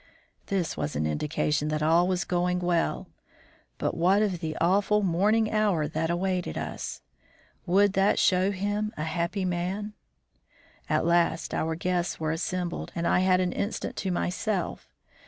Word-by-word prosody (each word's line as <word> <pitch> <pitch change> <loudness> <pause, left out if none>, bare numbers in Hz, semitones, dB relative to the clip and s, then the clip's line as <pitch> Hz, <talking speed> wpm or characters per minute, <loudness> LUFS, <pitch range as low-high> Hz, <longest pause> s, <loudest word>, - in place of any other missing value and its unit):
This 190 -4 -1
was 75 - -3
an 75 +2 0
indication 150 - 0
that 155 0 -1
all 165 +3 +4
was 185 -1 0
going 180 0 0
well. 175 -2 0 0.7
But - - -1
what 185 +5 +3
of 190 -5 -1
the 160 -2 -4
awful 205 +4 +3
morning 210 +5 +2
hour 205 -8 +2
that 160 +2 -2
awaited 180 +1 -1
us! - - -5 0.7
Would 195 +2 +4
that 195 +1 +3
show 185 +1 +3
him 205 +2 -2
a 155 - -2
happy 170 +4 -2
man? 185 +4 -2 1.0
At - - +1
last 170 -1 +2
our 160 0 -1
guests 180 +1 -1
were 155 -1 -1
assembled, 175 +1 -3
and 170 - -2
I - - +3
had 185 0 +3
an 180 -1 0
instant 205 - -3
to 195 - -2
myself. 180 +2 -2
180 Hz, 155 wpm, -27 LUFS, 165-195 Hz, 1.0 s, all